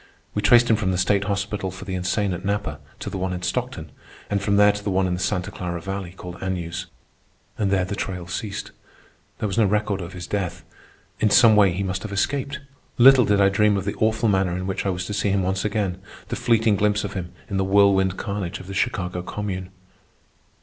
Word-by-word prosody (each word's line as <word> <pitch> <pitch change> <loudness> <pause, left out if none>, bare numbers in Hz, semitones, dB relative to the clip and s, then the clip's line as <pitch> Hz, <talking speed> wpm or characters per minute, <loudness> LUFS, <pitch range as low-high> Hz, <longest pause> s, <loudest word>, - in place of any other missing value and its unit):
We 105 - -1
traced 120 +2 +6
him 115 - +4
from 105 -4 -1
the 90 - 0
state 100 +2 +2
hospital 100 -1 -2
for 95 +1 -9
the 95 - -5
insane 95 +2 0
at 90 +1 -6
Napa 100 +1 -2 0.2
to - - -5
the 95 - -4
one 95 0 -1
in 90 0 -5
Stockton, 125 - -3 0.4
and 100 -1 +1
from 100 +1 +1
there 105 0 +6
to 105 0 -7
the 100 - -2
one 95 0 +2
in 90 - 0
the 90 - -2
Santa 90 -1 -1
Clara 85 -1 -4
Valley 95 0 -5
called 90 0 -9
Agnews, 90 -1 -3 0.7
and 100 -2 0
there 95 -2 +2
the 100 - -4
trail 90 -3 -4
ceased. 100 +4 -5 0.7
There - - -3
was 105 +2 -1
no 110 - +5
record 105 -1 0
of 85 0 -7
his 90 -2 -6
death. 95 -3 -3 0.6
In 110 - +3
some 115 0 +7
way 100 -3 +5
he 95 +3 -2
must 95 -1 -2
have 110 - -6
escaped. 140 +8 -1 0.4
Little 130 0 +8
did 105 -1 +2
I 100 -1 +5
dream 105 +1 +3
of 95 - -3
the 100 - -1
awful 110 +1 +2
manner 95 -3 +1
in 90 - -4
which 95 +1 -2
I - - +2
was 90 -1 -2
to 105 - -4
see 100 0 0
him 95 -1 +1
once 95 +1 -1
again—the 100 -3 -3
fleeting 115 -3 +2
glimpse 105 0 +1
of 100 -1 -4
him 90 -2 -5 0.2
in 100 - -3
the 95 - +2
whirlwind 95 -1 +3
carnage 100 -5 -4
of 95 - -10
the 100 - -7
Chicago 90 -5 -1
Commune. 95 -1 -4
100 Hz, 225 wpm, -23 LUFS, 95-105 Hz, 0.7 s, Little